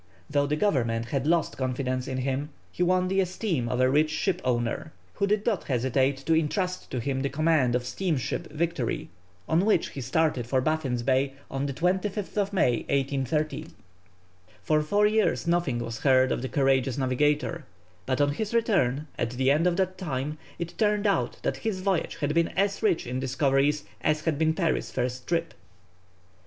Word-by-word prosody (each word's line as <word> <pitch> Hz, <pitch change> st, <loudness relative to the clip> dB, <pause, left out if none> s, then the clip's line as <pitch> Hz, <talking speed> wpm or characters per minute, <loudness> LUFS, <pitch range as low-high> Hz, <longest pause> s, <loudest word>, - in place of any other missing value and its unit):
Though 145 Hz, -1 st, +2 dB
the 150 Hz, -, +1 dB
Government 115 Hz, -, 0 dB
had 140 Hz, +1 st, -1 dB
lost 170 Hz, -1 st, +1 dB
confidence 130 Hz, 0 st, -2 dB
in 130 Hz, -1 st, -3 dB
him, 135 Hz, +3 st, -2 dB, 0.2 s
he -, -, -6 dB
won 180 Hz, +1 st, +3 dB
the 195 Hz, +1 st, +1 dB
esteem 180 Hz, -, -1 dB
of 125 Hz, -, -1 dB
a 130 Hz, -, +5 dB
rich 150 Hz, +4 st, +3 dB
ship 175 Hz, +4 st, -1 dB
owner, 120 Hz, +4 st, -1 dB, 0.2 s
who 200 Hz, -, 0 dB
did 210 Hz, +1 st, +1 dB
not 215 Hz, -6 st, 0 dB
hesitate 130 Hz, +1 st, +1 dB
to 165 Hz, -, +3 dB
entrust 180 Hz, +4 st, -1 dB
to 130 Hz, -, -3 dB
him 135 Hz, +2 st, -2 dB
the 140 Hz, -, 0 dB
command 150 Hz, -4 st, +2 dB
of 125 Hz, -, 0 dB
the -, -, -7 dB
steamship 145 Hz, -, -2 dB
Victory, 155 Hz, -6 st, -2 dB, 0.4 s
on 165 Hz, +3 st, +3 dB
which 210 Hz, -5 st, +2 dB
he 135 Hz, -, -7 dB
started 130 Hz, -1 st, 0 dB
for 130 Hz, +2 st, +2 dB
Baffin's 130 Hz, -4 st, -1 dB
Bay 135 Hz, +1 st, +1 dB, 0.2 s
on 135 Hz, +1 st, -2 dB
the -, -, -2 dB
25th 195 Hz, +4 st, -1 dB
May, 130 Hz, -, +2 dB
1830. 140 Hz, +3 st, -1 dB, 1.0 s
For 155 Hz, -1 st, +2 dB
four 205 Hz, +7 st, +2 dB
years 215 Hz, -2 st, +2 dB
nothing 170 Hz, -7 st, +1 dB
was 115 Hz, -1 st, -4 dB
heard 130 Hz, -1 st, +4 dB
of -, -, -1 dB
the 130 Hz, -, -3 dB
courageous 135 Hz, -3 st, +2 dB
navigator, 145 Hz, +4 st, 0 dB, 0.4 s
but 130 Hz, -1 st, 0 dB
on 145 Hz, 0 st, +3 dB
his 215 Hz, +9 st, -3 dB
return, 155 Hz, -, +2 dB
at -, -, 0 dB
the 130 Hz, +3 st, +1 dB
end 155 Hz, +5 st, +3 dB
of 175 Hz, 0 st, +1 dB
that 185 Hz, -1 st, -1 dB
time, 150 Hz, -3 st, -3 dB, 0.2 s
it 170 Hz, 0 st, -6 dB
turned 210 Hz, -1 st, +2 dB
out 200 Hz, -2 st, +1 dB
that -, -, -1 dB
his 210 Hz, -5 st, -3 dB
voyage 190 Hz, -3 st, 0 dB
had 145 Hz, 0 st, -1 dB
been 170 Hz, 0 st, +3 dB
as 200 Hz, 0 st, +1 dB
rich 205 Hz, -7 st, +2 dB
in 125 Hz, +1 st, -3 dB
discoveries 135 Hz, +2 st, +1 dB, 0.2 s
as 155 Hz, 0 st, +2 dB
had 155 Hz, -3 st, 0 dB
been 160 Hz, 0 st, +2 dB
Parry's 170 Hz, -3 st, 0 dB
first 125 Hz, 0 st, -3 dB
trip. 170 Hz, -1 st, -1 dB
150 Hz, 185 wpm, -27 LUFS, 130-175 Hz, 1.0 s, a